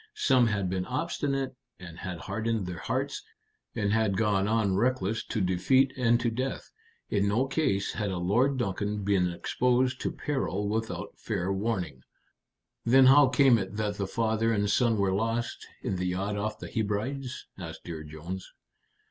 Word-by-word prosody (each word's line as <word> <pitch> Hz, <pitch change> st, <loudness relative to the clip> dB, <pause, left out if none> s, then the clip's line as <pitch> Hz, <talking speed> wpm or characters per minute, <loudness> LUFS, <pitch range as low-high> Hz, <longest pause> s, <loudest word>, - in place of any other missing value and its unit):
Some 130 Hz, -, +4 dB
had 105 Hz, -3 st, 0 dB
been 90 Hz, 0 st, -2 dB
obstinate, 135 Hz, -1 st, -2 dB, 0.2 s
and 85 Hz, -2 st, -10 dB
had 90 Hz, -3 st, -5 dB
hardened 110 Hz, 0 st, -2 dB
their 90 Hz, -2 st, -5 dB
hearts, -, -, -2 dB, 0.5 s
and 100 Hz, -1 st, 0 dB
had 110 Hz, -3 st, +2 dB
gone 105 Hz, -3 st, +2 dB
on 105 Hz, -3 st, +2 dB
reckless 110 Hz, -1 st, +1 dB
to 110 Hz, -, -2 dB
defeat 115 Hz, +9 st, +3 dB
and 120 Hz, -2 st, +3 dB
to 120 Hz, -, +1 dB
death. 130 Hz, +3 st, -3 dB, 0.4 s
In 100 Hz, 0 st, +2 dB
no 110 Hz, +6 st, +2 dB
case 135 Hz, -9 st, 0 dB
had 105 Hz, -2 st, -2 dB
a 95 Hz, -, -2 dB
Lord 120 Hz, +10 st, +2 dB
Duncan 105 Hz, -2 st, -2 dB
been 95 Hz, -3 st, +2 dB
exposed 125 Hz, +7 st, +1 dB
to -, -, -1 dB
peril 105 Hz, -8 st, -2 dB
without 105 Hz, -3 st, -3 dB
fair 95 Hz, -3 st, -2 dB
warning." 95 Hz, -, -2 dB, 0.8 s
"Then 130 Hz, +3 st, +6 dB
how 140 Hz, +2 st, +8 dB
came 130 Hz, -2 st, +5 dB
it 95 Hz, +1 st, -5 dB
that 105 Hz, -1 st, -2 dB
the 100 Hz, -, -2 dB
father 115 Hz, +1 st, +1 dB
and 105 Hz, -2 st, +1 dB
son 115 Hz, 0 st, +3 dB
were 100 Hz, -2 st, +2 dB
lost 115 Hz, +4 st, -2 dB, 0.2 s
in 95 Hz, -, -1 dB
the 90 Hz, 0 st, -1 dB
yacht 95 Hz, +3 st, -1 dB
off 105 Hz, +1 st, -2 dB
the -, -, -8 dB
Hebrides?" 120 Hz, +5 st, -3 dB
asked 80 Hz, -3 st, -7 dB
Dear 80 Hz, -3 st, -6 dB
Jones. 80 Hz, +5 st, -7 dB
105 Hz, 165 wpm, -28 LUFS, 95-120 Hz, 0.8 s, how